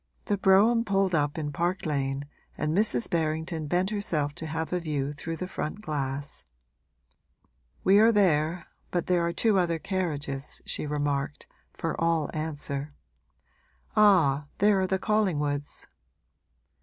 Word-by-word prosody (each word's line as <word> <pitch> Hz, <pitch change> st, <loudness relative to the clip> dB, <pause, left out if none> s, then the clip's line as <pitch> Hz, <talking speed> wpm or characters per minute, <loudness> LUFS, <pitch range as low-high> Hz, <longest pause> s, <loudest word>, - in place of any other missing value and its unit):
The 205 Hz, -, +1 dB
brougham 205 Hz, +4 st, +4 dB
pulled 195 Hz, -3 st, +1 dB
up 145 Hz, -1 st, +1 dB
in 150 Hz, -2 st, -3 dB
Park 175 Hz, +5 st, -1 dB
Lane 140 Hz, -2 st, -1 dB, 0.3 s
and 155 Hz, +1 st, -1 dB
Mrs. 195 Hz, -, +3 dB
Berrington 160 Hz, 0 st, -1 dB
bent 180 Hz, +5 st, +1 dB
herself 155 Hz, -9 st, -1 dB
to 160 Hz, -, -6 dB
have 160 Hz, +2 st, -3 dB
a 180 Hz, -, +1 dB
view 145 Hz, -4 st, -2 dB
through 165 Hz, +3 st, -5 dB
the 185 Hz, -, -4 dB
front 190 Hz, +2 st, -4 dB
glass. 140 Hz, -4 st, -4 dB, 1.4 s
'We 195 Hz, +2 st, +6 dB
are 225 Hz, +2 st, +6 dB
there, 170 Hz, -5 st, +2 dB, 0.2 s
but 175 Hz, -2 st, -1 dB
there 180 Hz, -2 st, +2 dB
are 170 Hz, -, 0 dB
two 200 Hz, +3 st, +2 dB
other 170 Hz, -2 st, +1 dB
carriages,' 150 Hz, -6 st, -3 dB
she -, -, -3 dB
remarked, 145 Hz, -1 st, -2 dB, 0.3 s
for 165 Hz, 0 st, -3 dB
all 165 Hz, -3 st, +1 dB
answer. 145 Hz, -2 st, -4 dB, 1.0 s
'Ah, 165 Hz, -9 st, +4 dB
there 205 Hz, -1 st, +4 dB
are 190 Hz, -, +1 dB
the 190 Hz, -, +1 dB
Collingwoods.' 150 Hz, -9 st, -1 dB
160 Hz, 140 wpm, -27 LUFS, 145-190 Hz, 1.4 s, We